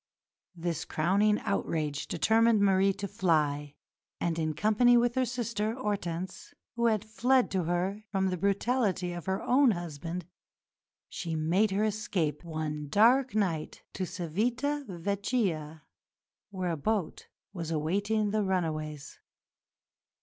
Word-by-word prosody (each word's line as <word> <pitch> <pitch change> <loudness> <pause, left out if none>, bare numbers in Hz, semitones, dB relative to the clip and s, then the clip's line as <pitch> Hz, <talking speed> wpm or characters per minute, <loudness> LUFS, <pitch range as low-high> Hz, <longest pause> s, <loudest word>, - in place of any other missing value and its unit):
This 170 -2 -3
crowning 200 +6 +2
outrage 155 -7 -2
determined 225 +5 +3
Marie 195 -1 +4
to 200 +1 -5
fly, 150 -6 0 0.4
and, 165 -1 -1
in 155 -1 -1
company 220 +8 +4
with 240 0 +2
her 260 0 +1
sister, 230 -3 -2
Hortense, 190 -7 -4 0.2
who 235 0 +2
had 215 -2 +1
fled 250 +4 +2
to 185 -3 0
her 185 +5 -1
from 190 -2 +1
the 180 - -2
brutality 200 -1 0
of 175 0 -7
her 190 +1 -1
own 265 +1 +4
husband, 175 -2 -4 0.8
she 165 -3 -4
made 170 +7 +2
her 195 +2 0
escape 205 -8 -1
one 155 -2 -4
dark 245 - +4
night 175 -7 -1
to 185 -1 -3
Civita 240 - -1
Vecchia, 180 - -2 0.7
where 185 -3 -2
a 165 - -2
boat 200 +3 -2 0.3
was 170 -4 -5
awaiting 200 +7 0
the 215 0 +1
runaways. 155 -6 -2
190 Hz, 130 wpm, -29 LUFS, 165-215 Hz, 0.8 s, Marie